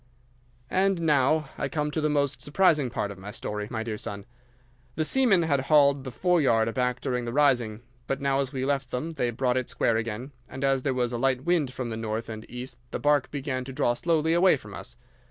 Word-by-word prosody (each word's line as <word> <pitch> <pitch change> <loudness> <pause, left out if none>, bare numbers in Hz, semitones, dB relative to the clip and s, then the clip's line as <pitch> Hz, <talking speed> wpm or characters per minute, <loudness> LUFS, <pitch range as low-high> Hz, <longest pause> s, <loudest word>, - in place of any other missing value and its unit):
"'And 190 -1 +2
now 150 -1 +2
I - - -1
come 150 -2 -1
to 155 - -1
the 155 - +1
most 140 -2 0
surprising 150 -4 +3
part 105 -3 -3
of 100 - -10
my 100 +2 -8
story, 105 -1 -4
my 110 -1 -3
dear 110 -2 -4
son. 100 0 -5 0.7
The 155 - 0
seamen 225 -6 +4
had 145 -4 +1
hauled 140 -3 +5
the - - -3
foreyard 135 -8 +2
aback 125 +1 -1
during 125 -2 -2
the 120 - -3
rising, 120 -5 +2 0.2
but 135 - -1
now 140 -1 +1
as 135 -2 -1
we 130 -2 -2
left 135 -2 -1
them 155 +7 -3
they 125 -6 -1
brought 125 +1 0
it 130 - -2
square 115 - +1
again, 115 +4 -4 0.2
and 130 +1 -6
as 135 -1 +2
there 130 -1 -1
was 125 -1 0
a 120 - -3
light 130 0 +1
wind 165 -6 +1
from 125 -2 -5
the 110 - -4
north 110 +1 -3
and 110 -1 -8
east 125 +1 -7
the - - -3
barque 145 -2 +2
began 135 -2 -3
to 135 - -8
draw 130 -3 +2
slowly 160 +4 +1
away 175 -2 +5
from 105 -5 -12
us. - - -9
135 Hz, 225 wpm, -27 LUFS, 120-150 Hz, 0.7 s, hauled